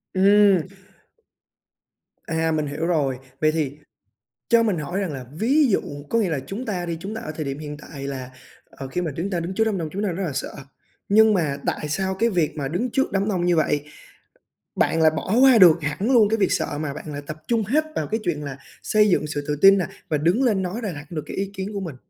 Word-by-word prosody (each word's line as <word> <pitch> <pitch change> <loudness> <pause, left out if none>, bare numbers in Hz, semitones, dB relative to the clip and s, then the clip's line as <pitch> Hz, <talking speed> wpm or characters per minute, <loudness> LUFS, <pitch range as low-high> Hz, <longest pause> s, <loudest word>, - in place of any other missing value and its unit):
Ừm. 195 -2 +5 1.6
À, 160 0 0
mình 155 -1 0
hiểu 145 +3 -3
rồi. 140 -7 0 0.2
Vậy 155 0 +4
thì 150 -2 -2 0.7
cho 235 -1 +5
mình 205 -7 0
hỏi 175 +6 -3
rằng 185 -6 -2
là 130 -2 -6
ví 265 - +3
dụ 195 - +2 0.3
có 230 - +2
nghĩa 205 -5 +1
là 145 -4 -1
chúng 225 - -5
ta 180 -4 -3
đi, 170 -1 -3
chúng 200 +5 -6
ta 220 - -5
ở 155 - -6
thời 155 - -3
điểm 140 0 -4
hiện 150 -1 -6
tại 140 -2 -8
là, 130 -2 -5 0.4
ờ, 135 -1 -8
khi 180 - -2
mà 170 -3 -2
chúng 185 +5 -2
ta 175 -2 -1
đứng 175 +3 -4
trước 220 - +2
đám 215 -4 -1
đông 160 -2 -3
chúng 200 +2 -3
ta 210 - 0
rất 190 - -4
là 145 - -3
sợ, 140 - -4 0.5
nhưng 215 +1 +5
mà 150 -6 0
tại 150 - -2
sao 190 +4 -1
cái 230 +4 +1
việc 170 -5 0
mà 140 -2 -3
đứng 225 - -2
trước 270 -3 0
đám 195 +1 0
đông 180 -4 0
như 175 -1 +3
vậy 150 -2 +1 0.9
bạn 160 - +1
lại 155 - +6
bỏ 200 - -1
qua 265 -3 +7
được 170 -4 +7
hẳn 185 - -1
luôn 225 -5 +5
cái 225 - +1
việc 200 - +1
sợ, 145 - -1
mà 140 -3 -3
bạn 150 0 -8
lại 145 - -5
tập 155 - -6
trung 230 -2 +1
hết 285 +10 +1
vào - - -1
cái 220 - -1
chuyện 150 -4 -2
là 140 -1 -6 0.3
xây 210 -1 +3
dựng 150 -4 +1
sự 145 -1 -3
tự 150 - 0
tin 195 0 +8
nè 180 - 0 0.2
và 155 - +1
đứng 175 - +2
lên 210 -6 +2
nói 190 +6 -4
ra 205 -4 -3
đạt 145 +2 -10
được 155 -3 -4
cái - - -8
ý 195 0 -2
kiến 195 +1 -5
của 200 - -3
mình? 165 -8 -6
175 Hz, 255 wpm, -23 LUFS, 150-205 Hz, 1.6 s, tin